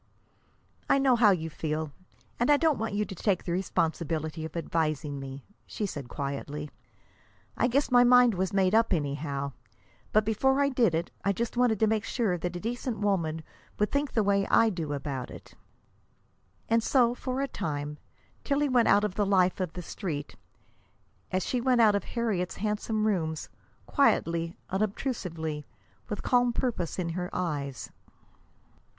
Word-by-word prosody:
"I - - +5
know 270 -2 +4
how 225 -3 +6
you 160 -4 0
feel, 155 0 -3 0.5
and 240 - +2
I 290 - +7
don't 315 -2 +2
want 220 -2 -2
you 210 +1 +1
to - - -7
take 190 0 0
the 175 - -3
responsibility 160 -3 -1
of 160 +2 -6
advising 155 -3 -1
me," 135 0 -8 0.2
she 210 - -3
said 145 -10 -6
quietly. 145 +1 -4 0.8
"I - - +2
guess 275 +3 +1
my 245 0 +7
mind 245 -1 +6
was 185 0 -1
made 195 -1 +2
up 225 -2 +4
anyhow. 140 -2 -2 0.6
But 215 0 +3
before 265 +6 +2
I 280 0 +3
did 240 - +2
it 165 - -2
I 200 - +2
just 235 +5 -3
wanted 240 -4 +2
to 220 - +5
be 220 0 +2
sure 220 -4 0
that 175 +1 -3
a - - -3
decent 240 +2 -3
woman 170 -6 0 0.3
would 210 - +1
think 285 0 -1
the 220 - +2
way 200 -1 +2
I 225 -1 +4
do 165 -6 -4
about 140 -3 -4
it." - - -12 1.1
And 230 0 +3
so, 240 0 +3
for 255 +1 -4
a 275 - 0
time, 150 - -4 0.4
Tillie 290 0 +1
went 245 -3 +4
out 205 +1 +5
of 210 -3 -1
the 205 +1 +1
life 185 -2 +3
of 180 -4 -2
the 180 - -6
Street 155 -5 -5 1.0
as 185 0 0
she 250 - -1
went 250 -1 +3
out 220 -3 +6
of 200 - -1
Harriet's 215 -7 -2
handsome 215 +1 -1
rooms, 160 -7 -1 0.4
quietly, 165 +1 +1
unobtrusively, 180 - -2 0.4
with 210 - -4
calm 245 -1 +3
purpose 230 -10 -2
in 175 -3 -2
her 180 +1 -3
eyes. 145 -7 -3
195 Hz, 170 wpm, -28 LUFS, 160-230 Hz, 1.1 s, I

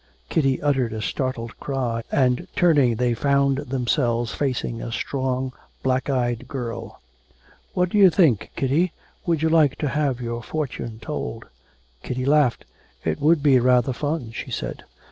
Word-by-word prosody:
Kitty 135 -4 +2
uttered 135 -6 +1
a 110 - -4
startled 125 -1 -3
cry 125 -5 -2
and 125 -2 +2
turning 145 -9 +4
they 120 +1 +1
found 140 +2 +2
themselves 125 -3 0
facing 125 -4 -2
a 120 - -5
strong 130 +1 -2 0.3
black 130 +1 0
eyed 120 -3 0
girl. 125 -5 -6 0.8
'What 180 0 +2
do 210 - +1
you 195 -2 +9
think, 160 - +3
Kitty, 155 +7 +1 0.3
would 165 -2 +1
you 160 - +3
like 155 -4 +4
to 150 - -2
have 140 -4 0
your 120 -1 -4
fortune 120 -4 -4
told?' 65 - -5 0.6
Kitty 130 0 -3
laughed. 140 -4 +3 0.4
'It 80 -1 -1
would 155 0 +4
be 135 -4 +6
rather 125 +1 +3
fun,' 145 -2 -3
she 115 - -6
said. - - -5
130 Hz, 150 wpm, -23 LUFS, 120-145 Hz, 0.8 s, you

